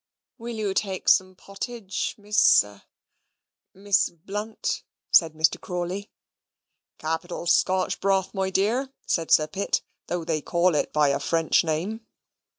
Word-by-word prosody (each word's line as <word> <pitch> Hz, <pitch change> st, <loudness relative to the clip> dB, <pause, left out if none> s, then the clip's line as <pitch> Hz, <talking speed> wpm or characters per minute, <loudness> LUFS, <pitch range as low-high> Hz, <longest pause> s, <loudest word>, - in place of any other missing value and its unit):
"Will 235 Hz, 0 st, -6 dB
you 210 Hz, -3 st, -1 dB
take 195 Hz, -1 st, -2 dB
some 185 Hz, -1 st, +4 dB
potage, 200 Hz, +1 st, -5 dB
Miss 210 Hz, +1 st, +5 dB
ah 105 Hz, 0 st, -15 dB, 0.9 s
Miss 200 Hz, 0 st, +2 dB
Blunt? 205 Hz, +6 st, -4 dB, 0.3 s
said 165 Hz, -3 st, +5 dB
Mr. 160 Hz, +1 st, +1 dB
Crawley. 180 Hz, +3 st, -4 dB, 0.9 s
"Capital 165 Hz, +2 st, -4 dB
Scotch 185 Hz, +2 st, +2 dB
broth, 195 Hz, -1 st, +1 dB
my 190 Hz, -1 st, -1 dB
dear," 225 Hz, +8 st, 0 dB
said 165 Hz, -2 st, -1 dB
Sir 155 Hz, -, +5 dB
Pitt, 195 Hz, +6 st, -1 dB, 0.2 s
"though 175 Hz, -2 st, -3 dB
they 160 Hz, -2 st, -1 dB
call 175 Hz, +2 st, +2 dB
it 150 Hz, -, 0 dB
by 150 Hz, -2 st, +3 dB
a 140 Hz, -, +1 dB
French 165 Hz, +1 st, +2 dB
name." 185 Hz, +8 st, -3 dB
185 Hz, 135 wpm, -25 LUFS, 165-205 Hz, 0.9 s, Miss